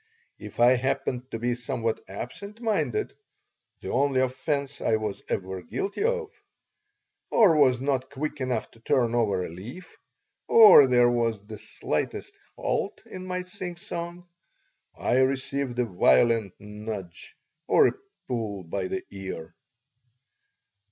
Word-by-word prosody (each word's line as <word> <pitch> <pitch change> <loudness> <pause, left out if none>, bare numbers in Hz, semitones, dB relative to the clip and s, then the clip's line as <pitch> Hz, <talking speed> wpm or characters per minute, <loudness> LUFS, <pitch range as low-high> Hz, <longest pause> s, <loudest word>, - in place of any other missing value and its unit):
If - - -10
I 125 +2 +6
happened 130 0 -2
to - - -4
be 120 +2 0
somewhat 120 -2 -3
absent 200 - -8
minded 240 - -1 0.7
(the - - -5
only 140 -1 +2
offense 140 +2 -2
I 110 - +2
was 105 -2 -3
ever 95 0 -3
guilty 130 - -3
of), 470 -2 0 1.0
or 205 -8 +5
was 130 -4 +4
not 130 -1 -1
quick 145 +1 -4
enough 130 -1 -2
to 115 - -20
turn 120 0 +1
over 100 -6 +1
a - - -6
leaf, 110 - -10 0.5
or 205 -11 +9
there 120 -1 +5
was 115 -4 -1
the 110 0 -9
slightest - - -3 0.2
halt - - -2
in 185 0 -8
my 180 0 -2
singsong, 175 -1 -6 0.7
I 125 - +1
received 130 -1 0
a 125 - +2
violent 100 - +3
"nudge" 105 -3 -8 0.3
or 445 - +6
a - - -6 0.3
pull 110 -6 -3
by 95 +3 -3
the 95 - -3
ear. 95 -5 -7
125 Hz, 130 wpm, -26 LUFS, 110-150 Hz, 1.0 s, or